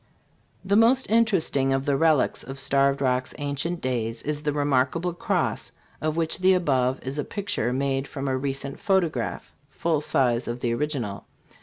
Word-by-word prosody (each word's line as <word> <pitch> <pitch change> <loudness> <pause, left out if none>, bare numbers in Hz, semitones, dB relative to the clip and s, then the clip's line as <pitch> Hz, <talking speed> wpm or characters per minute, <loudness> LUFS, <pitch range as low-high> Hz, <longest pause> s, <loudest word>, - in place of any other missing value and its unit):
The 200 +1 +2
most 235 +3 +4
interesting 190 - +3
of 135 0 -1
the 140 - +2
relics 155 -1 +2
of 135 0 -7
Starved 140 +1 +3
Rock's 130 -1 0
ancient 145 +4 -2
days 115 -3 -2
is 150 0 -2
the 150 -1 -1
remarkable 145 +4 0
cross, 175 - -1 0.3
of 155 0 -1
which 165 +1 0
the 185 0 +4
above 130 -7 +1
is 135 +3 -4
a - - 0
picture 190 - -2
made 135 +1 -1
from 140 0 -5
a 130 - 0
recent 135 +1 -3
pho 195 -2 +3
tograph 155 -9 -4 0.2
(full 155 +2 -1
size 125 -4 +1
of 120 +1 -4
the 120 -1 0
original.) 120 -6 -3
140 Hz, 170 wpm, -25 LUFS, 130-165 Hz, 0.3 s, most